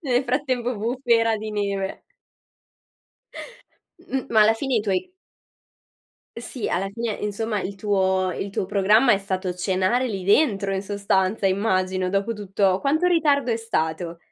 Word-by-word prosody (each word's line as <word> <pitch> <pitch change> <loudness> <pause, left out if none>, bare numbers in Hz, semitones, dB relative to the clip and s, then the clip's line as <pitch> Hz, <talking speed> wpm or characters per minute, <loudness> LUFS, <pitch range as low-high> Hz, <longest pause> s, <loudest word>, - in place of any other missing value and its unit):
Nel 260 -4 0
frattempo 250 -2 -1
bufera 230 0 +1
di 215 0 -6
neve. 200 -2 -2 2.1
M 265 0 -2
ma 220 -2 +4
alla 220 +1 +4
fine 265 +2 -2
i 225 - +3
tuoi 205 - -2 1.3
Sì, 235 0 -5
alla 195 +3 -1
fine, 230 0 -3
insomma, 210 +1 -3
il 195 +1 -5
tuo 190 -2 +1
il 200 - -4
tuo 195 - -2
programma 210 +5 +4
è 195 - +2
stato 190 -2 -3
cenare 190 +7 0
lì 195 -4 -4
dentro, 200 -3 +2
in 190 - -2
sostanza, 200 0 0
immagino, 185 -2 0
dopo 200 +4 0
tutto 195 -2 0
quanto 310 +5 +1
ritardo 290 -7 +2
è 225 - 0
stato? 170 -6 -2
205 Hz, 145 wpm, -23 LUFS, 190-235 Hz, 2.1 s, ma